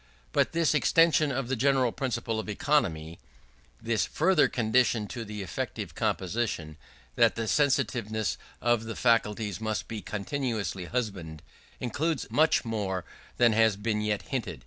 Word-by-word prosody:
But -, -, +2 dB
this 165 Hz, -2 st, +2 dB
extension 155 Hz, -1 st, +4 dB
of 130 Hz, -1 st, -2 dB
the 135 Hz, -, 0 dB
general 130 Hz, 0 st, +2 dB
principle 115 Hz, -4 st, -2 dB
of 110 Hz, -, -5 dB
economy 85 Hz, -, 0 dB, 0.6 s
this 115 Hz, -3 st, 0 dB
further 185 Hz, +4 st, +3 dB
condition 115 Hz, -1 st, +2 dB
to 120 Hz, -, -5 dB
effective 105 Hz, -5 st, -5 dB
composition, 90 Hz, -6 st, -2 dB, 0.4 s
that -, -, +4 dB
the 115 Hz, -1 st, -3 dB
sensitiveness 115 Hz, -6 st, +1 dB, 0.2 s
of 120 Hz, -1 st, +2 dB
the 110 Hz, -, -5 dB
faculties 110 Hz, -3 st, +1 dB
must 110 Hz, -1 st, -2 dB
be 110 Hz, -2 st, -5 dB
continuously 105 Hz, -, -3 dB
husbanded 95 Hz, -9 st, -4 dB, 0.4 s
includes 145 Hz, +5 st, -1 dB
much 155 Hz, -3 st, +3 dB
more 100 Hz, -5 st, -2 dB, 0.3 s
than 120 Hz, -2 st, +5 dB
has 110 Hz, -1 st, +4 dB
been 105 Hz, +1 st, -1 dB
yet 105 Hz, -1 st, -1 dB
hinted. 120 Hz, -, -4 dB
115 Hz, 135 wpm, -28 LUFS, 105-130 Hz, 0.6 s, than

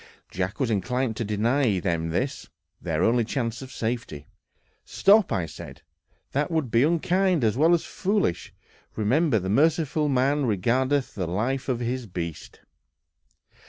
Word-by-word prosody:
Jack 95 Hz, -, -3 dB
was 130 Hz, -4 st, 0 dB
inclined 115 Hz, +4 st, -1 dB
to -, -, -1 dB
deny 110 Hz, +1 st, +1 dB
them 85 Hz, -3 st, -1 dB
this, 130 Hz, +12 st, -3 dB, 0.3 s
their 85 Hz, -1 st, -1 dB
only 120 Hz, +1 st, +3 dB
chance 115 Hz, -1 st, -3 dB
of 130 Hz, -1 st, -9 dB
safety. 115 Hz, -, -4 dB, 0.6 s
"Stop," 205 Hz, 0 st, +3 dB, 0.2 s
said -, -, -11 dB
I, -, -, -45 dB
"that 145 Hz, +2 st, 0 dB
would 160 Hz, -8 st, -1 dB
be 115 Hz, -, +4 dB
unkind 170 Hz, +2 st, +2 dB
as 110 Hz, -1 st, +2 dB
well 160 Hz, +6 st, +4 dB
as 170 Hz, -, -3 dB
foolish; 195 Hz, -, -1 dB, 0.4 s
remember, 125 Hz, +5 st, +2 dB
the 95 Hz, -2 st, -3 dB
merciful 150 Hz, -, +2 dB
man 135 Hz, +1 st, +1 dB
regardeth 130 Hz, +6 st, 0 dB
the 90 Hz, -4 st, -3 dB
life 125 Hz, +10 st, -2 dB
of 125 Hz, -2 st, -1 dB
his 120 Hz, 0 st, -3 dB
beast." 85 Hz, -4 st, -7 dB
125 Hz, 145 wpm, -25 LUFS, 105-145 Hz, 0.6 s, be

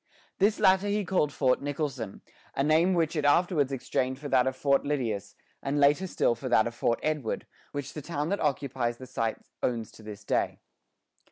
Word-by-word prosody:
This 205 Hz, +2 st, +3 dB
latter 190 Hz, +1 st, +4 dB
he 205 Hz, 0 st, 0 dB
called 165 Hz, -5 st, +1 dB
Fort 130 Hz, -2 st, +2 dB
Nicholson, 140 Hz, -7 st, -3 dB, 0.3 s
a 135 Hz, -, +1 dB
name 160 Hz, +5 st, +4 dB
which 165 Hz, -1 st, +1 dB
it 150 Hz, -, 0 dB
afterwards 145 Hz, -1 st, +3 dB
exchanged 130 Hz, 0 st, -1 dB
for 145 Hz, 0 st, -6 dB
that 130 Hz, -1 st, +4 dB
of 130 Hz, -, -1 dB
Fort 140 Hz, +1 st, +2 dB
Lydius, 120 Hz, -9 st, -2 dB, 0.3 s
and 140 Hz, +1 st, -1 dB
later 145 Hz, +6 st, +4 dB
still 145 Hz, -, +2 dB
for 125 Hz, +3 st, -6 dB
that 110 Hz, -2 st, +5 dB
of 120 Hz, -, -3 dB
Fort 115 Hz, 0 st, 0 dB
Edward, 150 Hz, -7 st, -1 dB, 0.3 s
which 145 Hz, -2 st, -5 dB
the 150 Hz, -, -6 dB
town 150 Hz, 0 st, -3 dB
that 200 Hz, -, 0 dB
occupies 130 Hz, -4 st, -1 dB
the 130 Hz, -, -9 dB
site 115 Hz, -3 st, -2 dB, 0.2 s
owns 115 Hz, -3 st, -1 dB
to 115 Hz, -, -15 dB
this 105 Hz, -1 st, -9 dB
day. -, -, 0 dB
140 Hz, 190 wpm, -28 LUFS, 125-155 Hz, 0.3 s, that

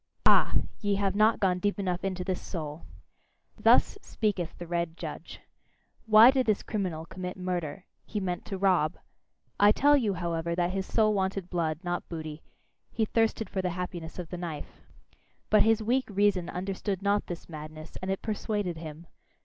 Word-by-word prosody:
Ah! -, -, +5 dB, 0.2 s
ye 205 Hz, -2 st, +1 dB
have 195 Hz, -1 st, +1 dB
not 215 Hz, +2 st, +4 dB
gone 180 Hz, -2 st, +2 dB
deep 205 Hz, +3 st, 0 dB
enough 180 Hz, -3 st, -2 dB
into 185 Hz, -1 st, -2 dB
this 185 Hz, 0 st, -2 dB
soul! 155 Hz, -3 st, -6 dB, 0.7 s
Thus -, -, +4 dB
speaketh 195 Hz, -7 st, -2 dB
the 175 Hz, -, -7 dB
red 170 Hz, -1 st, -2 dB
judge: -, -, -7 dB, 0.7 s
"Why 220 Hz, +3 st, +9 dB
did 260 Hz, -2 st, +1 dB
this 215 Hz, -2 st, +2 dB
criminal 180 Hz, -7 st, -3 dB
commit 180 Hz, +2 st, -6 dB
murder? 180 Hz, -1 st, -3 dB, 0.2 s
He 210 Hz, -, -4 dB
meant 180 Hz, -2 st, -3 dB
to 195 Hz, -, -4 dB
rob." 180 Hz, -5 st, +2 dB, 0.6 s
I 205 Hz, +1 st, +7 dB
tell 290 Hz, +6 st, +5 dB
you, 220 Hz, -8 st, +1 dB
however, 170 Hz, -1 st, -2 dB
that 175 Hz, 0 st, +1 dB
his 190 Hz, 0 st, -3 dB
soul 215 Hz, -2 st, +3 dB
wanted 190 Hz, -2 st, -1 dB
blood, 165 Hz, -3 st, -1 dB
not 175 Hz, 0 st, -3 dB
booty: 155 Hz, -2 st, -6 dB, 0.5 s
he 225 Hz, -, +1 dB
thirsted 225 Hz, 0 st, +1 dB
for 190 Hz, -, -2 dB
the 180 Hz, -, -1 dB
happiness 175 Hz, -2 st, -5 dB
of 175 Hz, -3 st, -6 dB
the 180 Hz, -, -5 dB
knife! 165 Hz, -4 st, -7 dB, 0.7 s
But 215 Hz, -, +6 dB
his 225 Hz, 0 st, +3 dB
weak 255 Hz, +4 st, +1 dB
reason 200 Hz, -3 st, +2 dB
understood 190 Hz, +1 st, -3 dB
not 200 Hz, +1 st, +1 dB
this 175 Hz, -1 st, -7 dB
madness, 155 Hz, 0 st, -9 dB
and 185 Hz, -, -4 dB
it 195 Hz, -, -2 dB
persuaded 205 Hz, -5 st, -2 dB
him. 160 Hz, 0 st, -8 dB
185 Hz, 175 wpm, -29 LUFS, 170-205 Hz, 0.7 s, Why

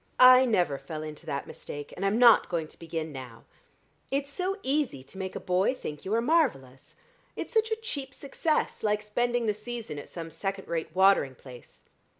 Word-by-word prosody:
I 255 Hz, +1 st, +9 dB
never 175 Hz, -, +1 dB
fell 155 Hz, -2 st, -6 dB
into 155 Hz, +1 st, -8 dB
that 140 Hz, -2 st, -3 dB
mistake, 145 Hz, 0 st, -8 dB
and -, -, -5 dB
I'm 195 Hz, +2 st, +2 dB
not 235 Hz, -2 st, +7 dB
going 165 Hz, -2 st, -2 dB
to -, -, -16 dB
begin 165 Hz, -1 st, -4 dB
now. 125 Hz, -4 st, -9 dB, 0.7 s
It 275 Hz, +1 st, 0 dB
is 280 Hz, -, -9 dB
so 375 Hz, +6 st, -1 dB
easy 265 Hz, -, 0 dB
to 135 Hz, +8 st, -14 dB
make 190 Hz, -1 st, -4 dB
a -, -, -3 dB
boy 185 Hz, +7 st, +1 dB
think 150 Hz, -, -7 dB
you 195 Hz, -, -2 dB
are 230 Hz, -, +2 dB
marvellous: 230 Hz, -, 0 dB, 0.4 s
it's -, -, -6 dB
such 445 Hz, 0 st, +3 dB
a 445 Hz, -, +1 dB
cheap 285 Hz, -12 st, -6 dB
success, 305 Hz, +2 st, -1 dB
like 210 Hz, -1 st, 0 dB
spending 240 Hz, +3 st, 0 dB
the 210 Hz, -, +2 dB
season 215 Hz, -6 st, -6 dB
at -, -, -10 dB
some 165 Hz, -1 st, -7 dB
second 195 Hz, +1 st, -4 dB
rate 165 Hz, -1 st, -2 dB
watering 190 Hz, -8 st, +4 dB
place. 125 Hz, -1 st, -14 dB
195 Hz, 195 wpm, -28 LUFS, 155-255 Hz, 0.7 s, I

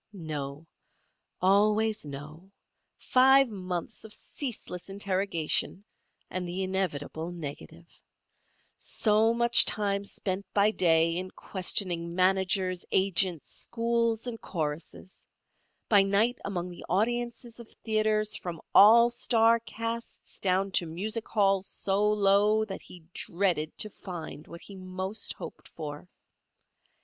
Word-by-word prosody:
No. 150 Hz, -4 st, -6 dB, 0.8 s
Always 210 Hz, 0 st, +3 dB
no. 150 Hz, +6 st, -9 dB, 0.5 s
Five 265 Hz, +1 st, +5 dB
months 185 Hz, -1 st, -5 dB
of 220 Hz, -, -11 dB
ceaseless 210 Hz, -7 st, -6 dB
interrogation 195 Hz, -2 st, -1 dB, 0.4 s
and 185 Hz, -1 st, -4 dB
the 185 Hz, +2 st, -2 dB
inevitable 170 Hz, -4 st, -3 dB
negative. 165 Hz, 0 st, -8 dB, 0.9 s
So 220 Hz, +1 st, +2 dB
much 235 Hz, +1 st, +6 dB
time 200 Hz, -1 st, 0 dB
spent 200 Hz, -1 st, -5 dB
by 205 Hz, +1 st, +4 dB
day 165 Hz, -4 st, +3 dB
in 185 Hz, +1 st, -3 dB
questioning 175 Hz, -3 st, -2 dB
managers, 185 Hz, 0 st, +1 dB
agents, 190 Hz, -3 st, +2 dB
schools 230 Hz, -1 st, -1 dB
and 235 Hz, -2 st, -6 dB
choruses; 160 Hz, +2 st, -6 dB, 0.6 s
by 205 Hz, -3 st, +6 dB
night 200 Hz, +5 st, +2 dB
among 180 Hz, -2 st, -4 dB
the 175 Hz, -, -11 dB
audiences 235 Hz, +4 st, -1 dB
of 235 Hz, -, -11 dB
theatres 215 Hz, -1 st, +1 dB
from 170 Hz, -3 st, -6 dB
all 235 Hz, +4 st, +8 dB
star 230 Hz, -1 st, +3 dB
casts 230 Hz, +1 st, -7 dB
down 190 Hz, +1 st, +1 dB
to 175 Hz, -2 st, +1 dB
music 215 Hz, +8 st, -4 dB
halls 195 Hz, -3 st, +2 dB
so 205 Hz, +2 st, 0 dB
low 210 Hz, +1 st, +3 dB
that 195 Hz, -3 st, -7 dB
he 175 Hz, -2 st, -14 dB
dreaded 170 Hz, -4 st, -1 dB
to 215 Hz, -, -1 dB
find 170 Hz, -6 st, -8 dB
what 170 Hz, -, -10 dB
he 200 Hz, -, -11 dB
most 185 Hz, +2 st, -4 dB
hoped -, -, -10 dB
for. 150 Hz, +2 st, -8 dB
195 Hz, 115 wpm, -28 LUFS, 175-220 Hz, 0.9 s, all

